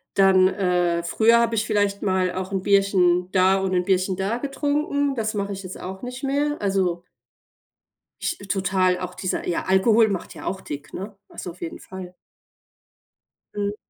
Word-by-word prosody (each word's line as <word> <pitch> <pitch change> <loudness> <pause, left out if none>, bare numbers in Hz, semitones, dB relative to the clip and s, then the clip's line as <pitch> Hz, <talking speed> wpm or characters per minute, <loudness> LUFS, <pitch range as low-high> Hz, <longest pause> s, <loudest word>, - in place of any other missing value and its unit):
dann 190 -1 +6
äh, 180 -3 +1
früher 225 +7 +4
habe 230 -1 +1
ich 220 0 0
vielleicht 205 -2 0
mal 185 -2 +1
auch 185 +1 -4
'n 195 -1 -1
Bierchen 185 -3 +3
da 190 0 +4
und 190 -1 -1
'n 180 -1 +1
Bierchen 190 0 +1
da 195 +4 -1
getrunken, 285 +1 -1
das 220 -3 -1
mache 200 -1 -2
ich 195 0 -7
jetzt 185 0 -8
auch 190 +1 -7
nicht 250 +2 -7
mehr. 290 +2 0
Also 185 -3 0 1.2
ich 345 - -1
total 185 -1 +1
auch 180 0 -5
dieser, 185 - -3
ja, 175 - -1
Alkohol 215 +4 +4
macht 195 -3 -4
ja - - -10
auch 190 +1 -3
dick, 145 0 -8
ne? 195 +2 -7
Also 180 - -7
auf 175 - -18
jeden 165 - -6
Fall. 185 -1 -9 1.4
Mhm. 205 0 -2
195 Hz, 175 wpm, -23 LUFS, 185-215 Hz, 1.4 s, dann